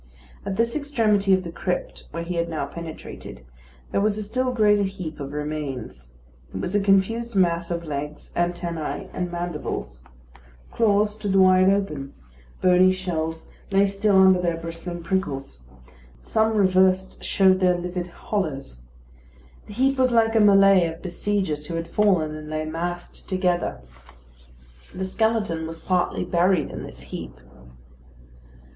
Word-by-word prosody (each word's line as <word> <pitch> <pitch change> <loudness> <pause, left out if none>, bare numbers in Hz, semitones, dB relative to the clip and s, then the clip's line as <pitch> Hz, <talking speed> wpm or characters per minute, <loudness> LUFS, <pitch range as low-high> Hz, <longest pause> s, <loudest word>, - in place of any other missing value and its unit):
At 195 - -2
this 230 +2 0
extremity 225 -9 +1
of 185 -1 +4
the 170 - -6
crypt, 180 +1 -4
where 170 - -5
he 175 +1 -4
had 170 0 0
now 160 -3 -2
penetrated, 155 - -9 0.5
there - - +1
was 210 0 +1
a 215 - -3
still 255 +5 -1
greater 210 -4 +3
heap 185 -6 -4
of 140 -1 -5
remains. 145 - -5 0.4
It 95 - -5
was 175 - -3
a 205 - +3
confused 205 +4 +1
mass 170 -2 +2
of 170 -1 -3
legs, 150 0 -6
antennæ, 175 -2 -2
and 180 -1 -3
mandibles. 150 - -4 0.7
Claws 210 -2 +2
stood 205 -2 -2
wide 185 0 +6
open; 155 -9 -1 0.5
bony 185 0 +6
shells 165 -4 -3 0.2
lay 195 +1 +4
still 200 0 +2
under 190 -1 +6
their 170 -2 0
bristling 165 +1 -7
prickles; 145 - -2 0.6
some 220 - 0
reversed 190 -1 +2
showed 190 -1 +4
their 180 -1 +3
livid 180 0 -4
hollows. 155 - -4 0.9
The 210 - -9
heap 270 +4 +1
was 255 0 +4
like 225 -2 +3
a - - +5
mêlée 195 -4 +6
of 165 - -12
besiegers 180 -5 -2
who 170 - -4
had 165 0 -3
fallen, 185 -7 +2
and 155 0 -8
lay 155 0 -2
massed 175 +2 -5
together. 180 - 0 1.1
The 190 +1 -2
skeleton 205 -5 0
was 165 0 -7
partly 180 -1 0
buried 180 0 +2
in - - -6
this 60 - -9
heap. 65 -1 -8
180 Hz, 145 wpm, -24 LUFS, 165-200 Hz, 1.1 s, wide